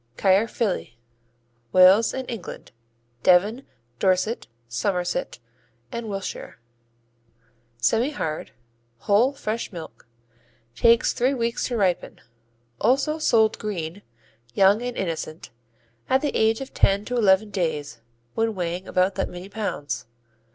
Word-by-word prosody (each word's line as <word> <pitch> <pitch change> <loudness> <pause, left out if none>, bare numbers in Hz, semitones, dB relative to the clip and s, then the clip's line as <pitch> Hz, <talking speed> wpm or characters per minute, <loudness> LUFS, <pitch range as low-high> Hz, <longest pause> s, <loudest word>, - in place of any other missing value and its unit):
Caerphilly 195 - +1 0.8
Wales 185 - +6
and 260 -1 -5
England 230 -7 -7 0.5
Devon, 205 - +3 0.3
Dorset, 190 +5 +1 0.2
Somerset 180 - -2 0.3
& 120 0 -24
Wilshire 210 - -5 1.2
Semihard; 220 - 0 0.5
whole 220 +6 +3
fresh 225 -4 -4
milk; 160 - -10 0.7
takes 230 - +4
three 260 +2 +1
weeks 235 -1 -1
to 245 - -2
ripen. 185 -4 0 0.6
Also 290 +5 +2
sold 220 -7 +3
"green," 190 -3 -4 0.5
young 200 +3 +5
and 245 0 -4
innocent, 165 -3 -4 0.6
at 265 +1 +3
the 295 - -2
age 220 +2 +2
of 270 - -8
ten 200 +1 +2
to 250 - -3
eleven 205 -2 +3
days 150 - -3 0.3
when 225 -1 0
weighing 180 +1 -3
about 185 +1 +2
that 195 - -2
many 180 +2 -9
pounds. 175 - -4
200 Hz, 110 wpm, -24 LUFS, 180-230 Hz, 1.2 s, Wales